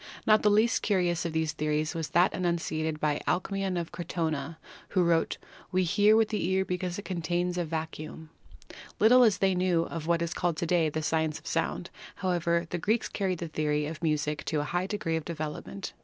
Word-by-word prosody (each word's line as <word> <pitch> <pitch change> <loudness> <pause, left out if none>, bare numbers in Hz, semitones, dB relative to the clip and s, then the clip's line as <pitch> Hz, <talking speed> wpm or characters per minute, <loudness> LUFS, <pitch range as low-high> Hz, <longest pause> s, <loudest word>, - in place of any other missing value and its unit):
Not 215 0 +5
the 210 - +4
least 215 +3 +3
curious 175 -4 +1
of 165 - -2
these 160 -1 0
theories 155 +1 -1
was 165 -2 -3
that 175 +2 +3
enunciated 160 -3 -1
by 150 -1 0
Alcmaeon 190 0 0
of 170 - -5
Crotona, 165 -3 -3 0.3
who 185 -3 +2
wrote: 170 -1 +2 0.3
"We 185 0 +2
hear 205 +5 +4
with 220 -1 +3
the 215 - -1
ear 190 0 +2
because 180 -1 -3
it 205 - -7
contains 175 0 -1
a 175 -1 -1
vacuum"! 160 0 -6 0.7
Lit 220 - +6
tle 250 0 +8
as 220 -4 +4
they 190 -1 +2
knew 180 -2 +2
of 165 -1 -6
what 170 0 +2
is 170 - -2
called 175 -3 -1
to 170 - -1
day 165 -2 +2
the 155 +1 -3
science 160 -1 0
of - - -16
sound, - - -2 0.2
however, 170 -2 0
the 175 - -2
Greeks 220 +7 0
carried 190 -3 -1
the 170 - -4
theory 150 -1 0
of 155 +2 -6
music 150 -2 0
to 155 -2 0
a 150 - -5
high 175 +1 0
degree 195 -6 -1
of 160 - -4
development. 160 +4 -5
170 Hz, 205 wpm, -29 LUFS, 160-185 Hz, 0.7 s, tle